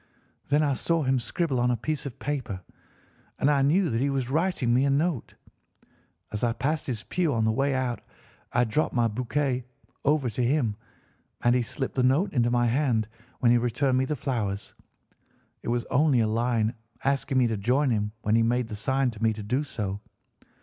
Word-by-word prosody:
Then 145 +2 +3
I 145 -2 +2
saw 165 +4 0
him 130 -1 +2
scribble 135 +2 -1
on 125 +1 +2
a 120 - +1
piece 150 +5 -3
of 125 - -9
paper, 130 -10 -3 0.8
and 145 - +3
I 140 -2 +3
knew 165 +5 +3
that 115 +1 0
he 140 - +2
was 135 -2 -1
writing 160 -6 +1
me 125 +2 +4
a - - +2
note. 145 -1 0 1.0
As 105 +1 -4
I 120 -1 +2
passed 145 +7 -2
his 120 -4 -3
pew 175 -4 0
on 110 -1 +1
the 110 - +3
way 135 +4 +1
out 125 -4 -1 0.5
I 120 - +3
dropped 125 +7 0
my 120 -1 +3
bouquet 125 +3 -1 0.4
over 145 -2 +2
to 120 +2 -1
him, 120 -4 +1 0.7
and 120 - +4
he 125 - +3
slipped 130 +3 -4
the 130 - +1
note 135 +10 +2
into 120 -3 +2
my 120 0 +2
hand 120 -3 +1 0.3
when 120 -2 +5
he 120 - +5
returned 130 +2 +1
me 130 - +1
the 150 - -2
flowers. 110 -7 -3 0.9
It - - -9
was 120 0 0
only 140 -1 +4
a 110 - +2
line 115 0 +1 0.3
asking 135 -1 0
me 130 - +5
to 115 -2 0
join 125 +7 +1
him 105 -2 0
when 105 - +1
he 115 - +5
made 120 +1 +1
the 105 - -5
sign 130 +4 0
to 110 -1 -12
me 110 -1 +3
to 105 0 -7
do 125 +8 0
so. 100 -8 -4
125 Hz, 205 wpm, -27 LUFS, 115-140 Hz, 1.0 s, when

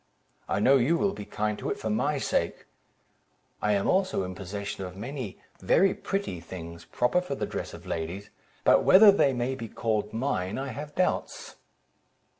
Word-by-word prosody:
I - - +1
know 135 +6 +5
you 140 +7 +2
will 200 +1 +1
be 105 - -7
kind 105 +1 -2
to - - -3
it - - -2
for 110 - -3
my 140 +7 +1
sake. - - -1 1.0
I 105 - +2
am 100 -1 +1
also 185 - +1
in 95 0 -5
possession 100 +2 -5
of 90 0 -8
many 125 -1 -6 0.2
very 195 +2 +3
pretty 195 - -3
things, 85 0 -9
proper 125 +9 +1
for 180 -6 -4
the - - -2
dress - - -5
of - - -13
ladies; 85 +5 -4 0.3
but - - +5
whether 200 +2 +8
they 170 -8 +3
may 125 +1 -1
be 115 -3 -6
called 105 -1 -1
mine, 110 -6 -2
I 135 +1 -3
have 145 +3 -7
doubts." 185 - -1
115 Hz, 180 wpm, -27 LUFS, 100-145 Hz, 1.0 s, whether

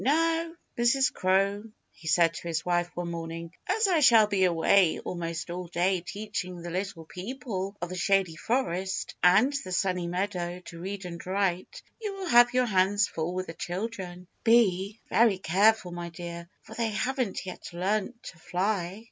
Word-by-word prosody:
"Now, 330 +4 +2 0.3
Mrs. 260 +3 +3
Crow," 195 +3 +1 0.3
he 160 - -13
said 165 +1 +4
to 170 - -7
his 165 -1 -2
wife 175 -1 +1
one 175 -1 -3
morning, 165 0 -6
"as 440 -1 +2
I 355 -4 +3
shall 230 -6 +7
be 200 -2 +2
away 175 +1 +4
almost 170 -1 -4
all 180 0 -5
day 175 +2 +1
teaching 185 -3 -5
the 175 - -5
Little 185 -2 -4
People 200 0 -5
of 175 - -4
the 185 - -5
Shady 190 -2 +2
Forest 190 -3 -1
and 200 +10 +5
the 185 - -8
Sunny 180 -1 0
Meadow 180 -1 -2
to 170 -2 -10
read 195 +1 -5
and 170 -1 -7
write, 190 - -2 0.2
you 415 -3 -3
will 380 -3 -5
have 240 -1 +7
your 255 0 +2
hands 200 -1 +3
full 165 +2 -3
with 185 0 -2
the 165 - -7
children. 180 0 -5 0.2
Be 215 -3 +3
very 225 -4 +4
careful, 190 +2 +3
my 175 0 -5
dear, 170 0 -8
for 220 - -12
they 230 0 -1
haven't 250 -2 -2
yet 185 - -7
learned 195 +6 -1
to 170 - -10
fly!" 185 +2 -1
185 Hz, 175 wpm, -28 LUFS, 175-220 Hz, 0.3 s, shall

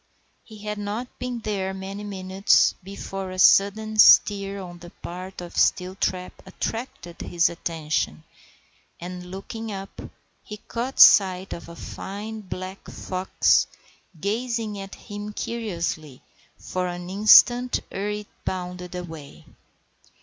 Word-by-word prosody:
He 220 - -13
had 210 0 -4
not 210 +5 -5
been 250 -2 -4
there 195 -3 -2
many 195 +2 -6
minutes 190 -1 +2
before 195 0 -6
a 185 - -7
sudden 215 +3 +4
stir 200 -1 +6
on 175 -2 -9
the 175 0 -11
part 185 +1 -8
of 175 - -9
Steeltrap 185 0 +1
attracted 190 -2 -6
his 170 -1 +2
attention, 155 - -2 0.8
and, 180 +1 -7
looking 220 +4 -6
up, 195 -1 -7 0.4
he 210 - -9
caught 240 +5 -5
sight 190 -1 +7
of 170 - -9
a 170 - -10
fine 210 +5 -7
black 185 0 -7
fox 185 0 +1 0.5
gazing 220 +1 -2
at 195 0 -8
him 205 0 -8
curiously 170 - -4 0.3
for 185 0 -3
an 175 0 -6
instant 240 +5 +6
ere 200 +2 -3
it 210 0 -4 0.2
bounded 180 -1 -5
away. 160 -5 -9
195 Hz, 120 wpm, -24 LUFS, 180-210 Hz, 0.8 s, sight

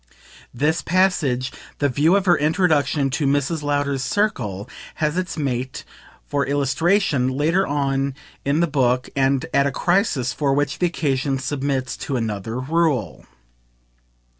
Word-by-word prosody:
This 150 +6 0
passage, 160 -9 +1 0.3
the 145 - +2
view 150 +7 +3
of 200 -1 +1
her 175 -2 +5
introduction 150 -3 +1
to 145 +1 0
Mrs. 145 +3 0
Lowder's 145 -2 0
circle, 125 - -1 0.3
has 155 0 -1
its 185 -2 -3
mate, 130 -3 -3 0.4
for 145 -1 0
illustration, 145 +2 +1
later 155 +9 +1
on 140 -1 0 0.3
in 145 +4 +1
the - - +4
book 130 -5 +1
and 135 -1 +2
at 140 0 +3
a - - -1
crisis 160 - +1
for 140 -2 0
which 145 +1 -1
the 180 - +3
occasion 140 -4 -1
submits 135 -1 -2
to 140 - -4
another 110 0 -3
rule. 145 - -1
140 Hz, 140 wpm, -22 LUFS, 130-160 Hz, 0.4 s, her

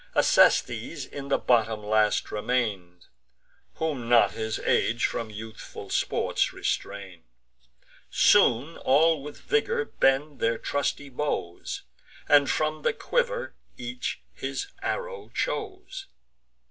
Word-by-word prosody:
Acestes - - +3
in 140 -1 -8
the 140 - +2
bottom 110 -3 +1
last 105 0 +2
remain'd, 105 -6 -2 0.7
Whom 140 -7 -3
not 120 -1 +6
his 110 0 -3
age 115 +1 +1
from 115 - -2
youthful 110 +1 -9
sports - - 0
restrain'd. 100 -4 -4 0.9
Soon 135 +8 +4
all 155 +3 +3
with 145 +1 -9
vigour 455 +2 0
bend 140 - +1
their 115 0 +1
trusty 145 +2 -2
bows, 125 -11 -3 0.4
And 145 -1 +5
from 155 0 0
the - - +1
quiver - - -1 0.2
each 125 - -5
his 135 - -4
arrow 485 -3 -4
chose. 385 -4 -4
135 Hz, 110 wpm, -27 LUFS, 110-160 Hz, 0.9 s, not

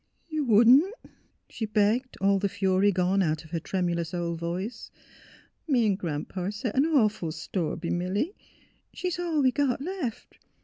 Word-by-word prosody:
' - - -46
' - - -41
You 305 - +1
wouldn 235 +3 +7
't? 395 +8 -9 0.2
" - - -45
she 220 - -4
begged, 215 +5 +1
all 195 0 +3
the 200 0 0
fury 195 0 +2
gone 185 +1 +1
out 155 -3 -1
of 155 - -16
her 170 - -1
tremulous 170 -1 -2
old 170 -1 -2
voice. 185 +7 -4 0.4
" - - -27
Me 250 -6 +3
'n' 205 - +3
Gran 165 -6 -3
'pa 185 0 -4
set 210 +2 -4
an 275 +4 +3
awful 215 - +2
store 160 +2 -3
b' 170 - -4
Milly. 190 - -1 0.6
She's 360 -1 -3
all 330 -5 0
we 260 - +4
got 275 -2 0
left. 300 - -5
205 Hz, 190 wpm, -27 LUFS, 180-255 Hz, 0.6 s, wouldn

